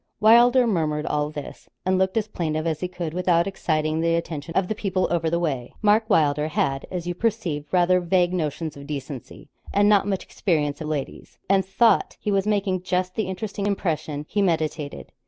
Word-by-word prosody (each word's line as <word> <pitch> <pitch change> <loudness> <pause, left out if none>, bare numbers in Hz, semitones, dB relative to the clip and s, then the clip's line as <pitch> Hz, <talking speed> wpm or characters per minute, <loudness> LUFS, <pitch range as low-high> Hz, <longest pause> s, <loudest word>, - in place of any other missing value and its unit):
Wylder 240 +3 +6
murmured 155 -8 0
all 150 0 0
this, 150 -1 -9 0.2
and 185 0 +2
looked 190 +3 +1
as 215 -1 0
plaintive 155 -6 -2
as 160 -2 -1
he 180 - -2
could 175 -3 -5
without 175 -1 +2
exciting 155 -5 -1
the 165 0 +2
attention 165 -1 -4
of 190 -1 +2
the 220 - -1
people 190 -3 -1
over 165 -2 +1
the 170 - +1
way. 135 -8 -3
Mark 215 +2 +3
Wylder 150 -5 +3
had, 135 -3 -1
as 180 -2 -4
you 175 - -2
perceive, 180 -8 -2
rather 180 0 +4
vague 180 0 +1
notions 160 -2 -2
of 140 0 -10
decency, 140 -3 -7 0.2
and 205 0 +3
not 205 -1 +4
much 195 -2 -1
experience 150 -5 -1
of 155 - -4
ladies; 150 -3 -5
and 195 -1 +3
thought 225 +5 +2
he 210 - -2
was 195 0 +1
making 200 -3 0
just 185 0 -1
the 215 -2 -2
interesting 200 +2 -3
impression 160 -6 -2
he 205 - 0
meditated. 155 -5 -2
175 Hz, 190 wpm, -24 LUFS, 155-195 Hz, 0.2 s, Wylder